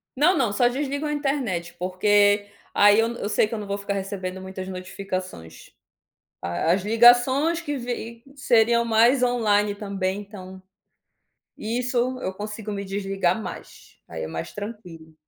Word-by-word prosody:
Não, 315 +7 +4
não, 235 -8 +1
só 240 +4 +3
desligo 280 +3 -2
a 300 - -1
internet, 245 - -2
porque 205 +3 +3 0.3
aí 205 +1 +6
eu 225 - +3
eu 205 - -4
sei 215 - +2
que 220 - -8
eu 225 - -3
não 205 - -7
vou 200 0 -2
ficar 200 0 -3
recebendo 190 -1 -4
muitas 190 0 -7
notificações. 185 - -7 0.7
A 85 - 0
as 185 - +2
ligações 245 +9 +5
que 290 -4 -3
vi 235 -1 -6
seriam 235 -3 +3
mais 235 +4 +4
on-line 210 -4 +2
também 200 -1 -3
então, 190 -2 -11 1.0
isso, 245 +2 -1
eu 190 -4 -3
consigo 210 +1 -6
me 200 -1 -4
desligar 195 -1 -1
mais, - - -10
aí - - -6
é - - -4
mais - - -6
tranquilo. 180 -7 -9
205 Hz, 155 wpm, -24 LUFS, 190-245 Hz, 1.0 s, aí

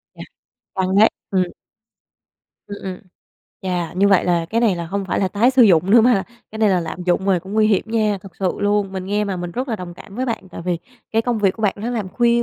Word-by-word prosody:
Chà, - - -8 0.5
căng 190 0 0
đấy, 220 - +7 0.2
ừm. 185 -2 +2 1.2
Ừm, 205 0 -7
ừm, 185 -1 -5 0.6
chà, 180 -2 -2
như 195 +2 +3
vậy 195 -3 +4
là 170 -2 +1
cái 230 - +1
này 210 -7 +2
là 170 -1 -4
không 200 +2 -3
phải 190 - -1
là 190 - +1
tái 230 +6 +3
sử 255 -1 +5
dụng 185 -2 +4
nữa 230 +1 +8
mà 245 +1 +5
là 195 - +1 0.3
cái 220 - -8
này 215 -2 +4
là 180 -2 +2
lạm 165 +2 -5
dụng 185 +2 +1
rồi 185 -3 +3
cũng 190 +3 -10
nguy 215 0 +3
hiểm 205 -3 +2
nha, 215 -3 0
thực 185 -4 -13
sự 190 -2 0
luôn. 205 -1 +1
Mình 190 -1 -5
nghe 210 +1 0
mà 195 -2 -3
mình 175 0 -5
rất 255 +2 -3
là 225 - -1
đồng 180 -2 -8
cảm 195 +2 -13
với 260 +1 -1
bạn, 225 -5 -4
tại - - -8
vì 175 -2 -1 0.3
cái 225 +1 +2
công 240 -2 -1
việc 195 -2 +3
của 225 - -9
bạn 200 - +2
nó 225 +4 -4
làm 215 -6 -3
khuya 235 +2 +2
200 Hz, 265 wpm, -20 LUFS, 185-220 Hz, 1.2 s, nữa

